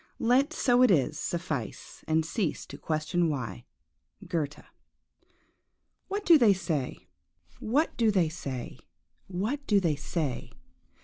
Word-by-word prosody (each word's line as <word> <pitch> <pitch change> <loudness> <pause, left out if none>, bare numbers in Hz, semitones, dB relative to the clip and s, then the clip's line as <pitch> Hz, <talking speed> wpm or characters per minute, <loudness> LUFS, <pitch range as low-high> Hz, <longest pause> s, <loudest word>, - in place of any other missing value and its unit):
Let 260 +6 +3
so 250 -5 +3
it 255 - +6
is 155 -4 +2
suffice, 160 -9 -4
and 160 0 +2
cease 175 -1 -2
to - - -10
question 160 +2 0
why." 125 - -4 0.6
GOETHE. 155 -5 -3 1.4
WHAT 405 +1 -3
do 335 -3 +8
they 220 -5 +6
say?–what 180 - -3
do 230 -2 +3
they 185 -5 +3
say?–what 180 - -6
do 205 -2 +4
they 165 -5 +1
say? 150 -2 -3
175 Hz, 115 wpm, -29 LUFS, 155-230 Hz, 1.4 s, do